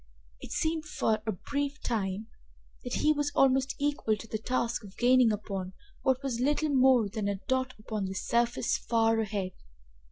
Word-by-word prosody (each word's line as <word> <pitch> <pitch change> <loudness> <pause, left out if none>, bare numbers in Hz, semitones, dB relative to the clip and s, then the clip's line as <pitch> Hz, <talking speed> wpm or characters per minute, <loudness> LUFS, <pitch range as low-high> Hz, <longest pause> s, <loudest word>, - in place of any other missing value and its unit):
It - - -10
seemed 320 0 -1
for 220 -7 0
a - - +2
brief 285 +8 -3
time 205 -2 -2 0.6
that 245 - -5
he 305 - +3
was 290 -1 -1
almost 270 -1 +3
equal 285 -7 0
to 215 - -9
the 220 -1 -4
task 235 0 -1
of 200 -1 -13
gaining 245 -1 +5
upon 195 -3 -4 0.3
what 265 +1 +1
was 255 -4 -2
little 295 +4 +1
more 260 -5 +5
than 210 0 -3
a 200 - 0
dot 260 0 0
upon 215 -1 -4
the 190 0 -4
surface 235 +4 +1
far 225 -1 +2
ahead. 205 -4 -2
235 Hz, 170 wpm, -29 LUFS, 215-265 Hz, 0.6 s, gaining